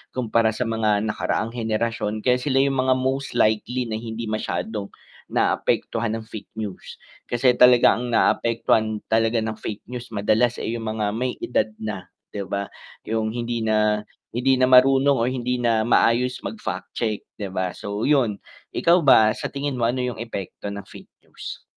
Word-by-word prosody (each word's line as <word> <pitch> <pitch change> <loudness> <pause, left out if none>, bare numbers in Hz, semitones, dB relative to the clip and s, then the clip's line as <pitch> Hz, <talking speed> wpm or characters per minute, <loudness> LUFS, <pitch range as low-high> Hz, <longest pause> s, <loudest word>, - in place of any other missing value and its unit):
kumpara 115 -2 +2
sa 125 - -1
mga 110 -2 +1
nakaraang 110 +1 -1
henerasyon 110 -2 -2
kaya 125 0 +3
sila 135 0 0
yung 135 -1 0
mga 130 0 +3
most 130 +1 -2
likely 120 +4 +1
na 110 -1 -3
hindi 115 0 -5
masyadong, 110 -1 -3 0.4
naapektuhan 115 -1 0
ng 110 - -9
fake 110 -1 -9
news, 105 -4 -6 0.3
kasi 125 +1 +3
talaga 125 -1 +6
ang 125 - -4
naapektuhan 115 -2 +2
talaga 115 +1 +2
ng 110 0 -2
fake 105 - -6
news 125 -1 -6
madalas, 110 +4 +2
eh, 115 - -3
yung 115 -1 -4
mga 105 - 0
may 125 +3 -2
edad 110 -3 +1
na, 100 -4 -6 0.2
di 100 - -3
ba? 100 0 -2 0.4
Yung 110 0 -1
hindi 120 -1 -2
na 105 -1 +2 0.3
hindi 130 +3 +2
na 130 - +4
marunong 135 +2 +6
o 120 - +2
hindi 125 -1 -2
na 115 -2 +2
maayos 125 +1 +2
mag-fact 215 -1 -5
check 110 -3 -1 0.2
di 105 - -4
ba 95 -1 -1
so 100 +3 -6
yun. 130 -8 +2 0.3
Ikaw 170 +1 +4
ba 110 -5 +7
sa - - -6
tingin 140 -1 -3
mo 120 - +1
ano 125 +2 0
yung 125 -3 -3
epekto 100 -2 -6
ng 100 - -6
fake - - -14 0.2
news? - - -8
115 Hz, 170 wpm, -23 LUFS, 110-125 Hz, 0.4 s, ba